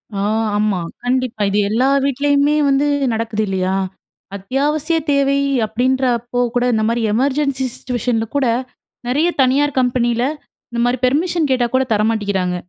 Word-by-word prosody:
ஆ, - - -2 0.4
ஆமா. 210 -3 +1 0.2
கண்டிப்பா. 250 -2 -1
இது 205 +1 +1
எல்லா 245 +5 +2 0.2
வீட்லேயுமே 285 +2 +2
வந்து 275 +1 +2 0.3
நடக்குது 220 -1 -2
இல்லயா! 190 0 -1 0.6
அத்தியாவசிய 285 - -1
தேவை 280 0 +2 0.3
அப்பிடின்றப்போ 245 0 0 0.2
கூட 245 - +2
இந்த 220 0 +1
மாதிரி 230 0 0
எமர்ஜென்சி 270 +2 0
சிச்சுவேஷன்ல 245 -3 -2
கூட 275 -3 +2 0.6
நிறைய 295 +7 +2
தனியார் 270 +2 +2
கம்பெனியில 240 -1 +1 0.5
இந்தமாரி 240 +1 0
பெர்மிஷன் 315 +3 +1
கேட்டா 245 -2 +2
கூட 265 - +3
தர 210 - +1
மாட்டிக்கிறாங்க. 200 -5 -1
250 Hz, 130 wpm, -18 LUFS, 225-275 Hz, 0.6 s, கூட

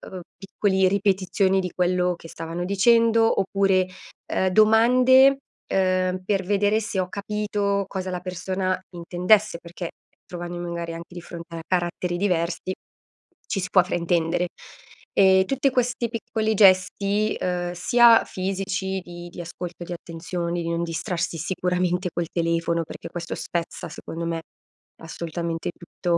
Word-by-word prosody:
uhm, 185 - -6 0.2
piccoli 195 -1 +1
ripetizioni 195 -1 +2
di 180 -1 -4
quello 180 0 +1
che 165 - -12
stavano 165 +2 -5
dicendo 225 +3 +4
oppure, 195 -1 +2 0.4
ehm, 190 - +1
domande, 250 +6 +6 0.3
ehm, 185 -1 +1
per 195 -1 +1
vedere 205 +3 +2
se 200 -2 -3
ho 185 - 0
capito 205 0 -1
cosa 190 -1 -4
la 180 - -3
persona 185 +1 -2
intendesse 180 +3 +2
perché, 175 0 -7 0.3
trovandomi 175 0 -6
magari 170 -1 -4
anche 170 +1 -9
di 175 - -6
fronte 170 0 -9
a 165 - -5
caratteri 175 0 -1
diversi, 180 -1 -1 0.7
ci 195 - -1
si 185 - -2
può 185 - +6
fraintendere. 175 0 0 0.7
Ehm, 190 -1 +5
tutte 270 +4 +1
questi 245 -1 0
piccoli 220 -1 -1
gesti, 200 +2 +3
uhm, 175 -1 -2
sia 230 +6 +6
fisici, 190 0 -3
di 175 0 -9
di 175 - -8
ascolto, 175 +1 -7
di 175 - -9
attenzioni, 170 +1 -4
di 165 - -3
non 170 0 -1
distrarsi 170 +1 -2
sicuramente 180 +2 -1
col 170 -1 -2
telefono, 170 0 0
perché - - -9
questo 170 -1 -5
spezza 170 -1 -4
secondo 165 +1 -7
me 165 -1 -2 0.6
assolutamente 165 0 -4
tutto, 170 0 -2
185 Hz, 140 wpm, -24 LUFS, 175-200 Hz, 0.7 s, domande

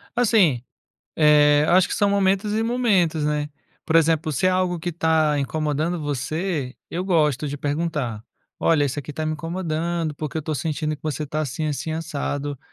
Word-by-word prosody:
Assim, 205 - +3 0.5
eh, 150 -1 +5
acho 185 +1 +5
que - - -3
são 205 -1 +2
momentos 200 +1 +1
e 220 +1 +1
momentos, 200 -10 +1
né. 150 0 -1 0.4
Por 160 - 0
exemplo, 160 -1 +3
se 145 +7 0
é - - +5
algo 185 -2 0
que 175 - -3
está 160 -2 +2
incomodando 155 +4 -1
você, 145 0 -3
eu 180 +2 -3
gosto 150 -6 +1
de 145 +1 -4
perguntar: 145 -7 -2 0.4
"Olha, 145 -3 +3
isso 140 +2 -2
aqui 150 - -7
está 155 +2 -4
me 155 - -1
incomodando, 165 -1 -2
porque 155 +2 -4
eu - - +1
estou 155 0 -3
sentindo 155 +2 -2
que - - -24
você 155 -1 -2
está 155 +2 -2
assim, 155 +3 -3
assim, 150 +2 -3
assado. 145 -3 -3
155 Hz, 180 wpm, -23 LUFS, 145-175 Hz, 0.5 s, eh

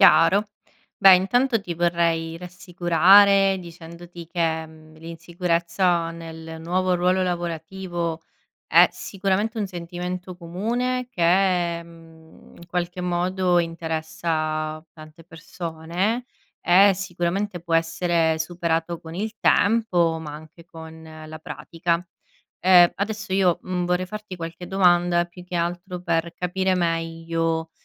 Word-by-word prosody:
Chiaro. 195 +2 +5 0.5
Beh, 190 -2 +8
intanto 235 +5 +1
ti 175 -3 -5
vorrei 165 -1 0
rassicurare, 185 +3 +4
dicendoti 170 0 -11
che, 165 -2 -1
mhmm, 155 0 -16
l'insicurezza 170 +1 -1
nel 160 -1 -9
nuovo 185 +2 0
ruolo 180 +1 +2
lavorativo 170 -1 -4 0.5
è - - +7
sicuramente 200 +3 -2
un 210 - -1
sentimento 180 +1 -6
comune, 235 +9 -2
che, 175 -1 +2
mhmm, 165 -1 -17
in 170 - -13
qualche 180 0 -3
modo 180 0 +1
interessa 160 -1 -2
tante 155 +1 -14
persone 170 +7 -4 0.3
e 195 +3 +6
sicuramente 185 +1 -3
può 170 -1 -3
essere 165 0 +1
superato 165 0 -2
con 160 0 -10
il 215 +3 -3
tempo 180 -7 +2
ma 150 -2 -7
anche 160 +2 -12
con 160 -1 -12 0.2
la 155 0 -9
pratica. 170 +1 -3 0.6
Ehm, 180 -2 +6
adesso 215 0 -4
io, 185 -3 +3
mhmm, 180 -1 -2
vorrei 180 +1 0
farti 210 -1 -8
qualche 165 +1 -7
domanda, 175 -2 +3
più 175 +1 -13
che 180 0 -5
altro, 175 +2 -3
per 170 0 -1
capire 185 +1 -1
meglio, 165 -1 -1
175 Hz, 115 wpm, -23 LUFS, 165-185 Hz, 0.6 s, Beh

